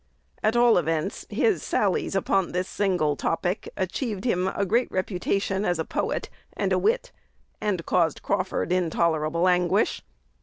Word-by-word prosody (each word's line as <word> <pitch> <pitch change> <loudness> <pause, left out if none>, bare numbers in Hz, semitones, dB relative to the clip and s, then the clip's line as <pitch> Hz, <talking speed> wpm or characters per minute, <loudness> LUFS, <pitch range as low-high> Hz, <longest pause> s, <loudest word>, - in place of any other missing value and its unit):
At 215 +2 +2
all 240 -4 +5
events, 160 -1 -2
his 430 -4 +1
sallies - - 0
upon 195 -2 +1
this 180 +1 -1
single 180 -7 0
topic 175 +6 -2
achieved 205 +2 -3
him 185 -6 +1 0.2
great 235 +6 +1
reputation 190 +1 -1
as 175 -4 +1
a 160 - -2
"poet" - - -2 0.3
and - - +1
a - - +3
wit, - - +1 0.5
and 190 -6 -1
caused 165 -4 +1
Crawford 185 -2 -1
intolerable 170 -1 +1
anguish. 180 +3 +2
185 Hz, 140 wpm, -25 LUFS, 170-205 Hz, 0.5 s, all